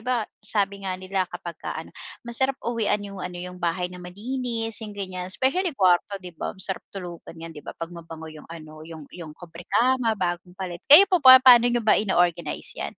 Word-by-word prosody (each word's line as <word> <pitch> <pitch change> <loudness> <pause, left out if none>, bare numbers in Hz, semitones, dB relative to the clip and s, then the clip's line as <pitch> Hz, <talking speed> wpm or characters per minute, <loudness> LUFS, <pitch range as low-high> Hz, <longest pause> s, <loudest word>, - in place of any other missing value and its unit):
ba 240 -1 -1 0.2
sabi 200 -1 -1
nga 185 - -2
nila 185 0 -2
kapagka 175 -2 -7
ano, 160 +1 -8 0.3
masarap 265 +3 0
uwian 225 -3 0
yung 200 -1 -8
ano, 180 -1 -6
yung 180 0 -8
bahay 180 +1 -2
na 180 - -10
malinis, 225 +4 -4
yung 210 -2 -8
ganiyan, 185 -2 -5
especially 285 - 0
kuwarto, 185 +1 +3
'di 180 -2 -10
ba? - - -4
Masarap 190 0 -2
tulugan 175 -3 -9
'yan, 165 0 -9
'di 150 - -10
ba? - - -10
'Pag 165 +1 -6
mabango 165 -2 -10
yung 155 -1 -13
ano, 155 -2 -11
yung 160 -1 -10
yung 160 -4 -10
kobrekama, 220 +8 0
bagong 180 -1 -3
palit. 180 -3 -6
Kayo 300 +8 +10
po 370 -3 +1
ba, 260 -2 +10
pa'no 245 -2 +7
niyo 240 -2 -1
ba 220 - +4
ino-organize 175 -5 0
'yan? - - -5
185 Hz, 195 wpm, -24 LUFS, 175-230 Hz, 0.3 s, Kayo